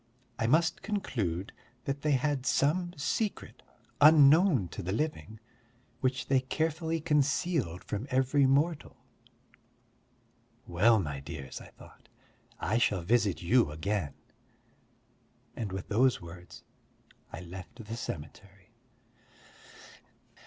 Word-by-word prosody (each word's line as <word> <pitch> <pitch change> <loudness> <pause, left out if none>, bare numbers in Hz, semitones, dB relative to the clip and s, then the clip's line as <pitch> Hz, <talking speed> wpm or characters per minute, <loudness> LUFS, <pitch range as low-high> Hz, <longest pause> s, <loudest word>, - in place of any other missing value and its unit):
I 110 - +1
must 165 +5 +2
conclude 110 - -3 0.3
that 140 0 -3
they 150 -1 +1
had 135 0 0
some 175 +5 +1
secret 205 +9 -3 0.4
unknown 150 - +6
to - - -7
the 90 - -3
living, 110 -3 -3 0.6
which 130 0 -1
they 135 +1 +3
carefully 160 +4 -2
concealed 150 - 0
from 105 +6 -4
every 130 +2 +3
mortal. 145 +4 0 1.7
"Well, 105 +7 +4
my 75 -6 -3
dears," 70 -3 -8
I - - -11
thought, - - -18 0.5
"I 110 +3 0
shall 100 -7 +1
visit 105 -2 +1
you 115 0 +3
again." 80 +1 -3 1.4
And 110 -4 -4
with 95 0 -5
those 125 +4 +3
words, 85 +1 -12 0.7
I 85 - -7
left 95 +6 -10
the 115 +2 -5
cemetery. 100 0 -8
125 Hz, 110 wpm, -30 LUFS, 95-150 Hz, 1.7 s, unknown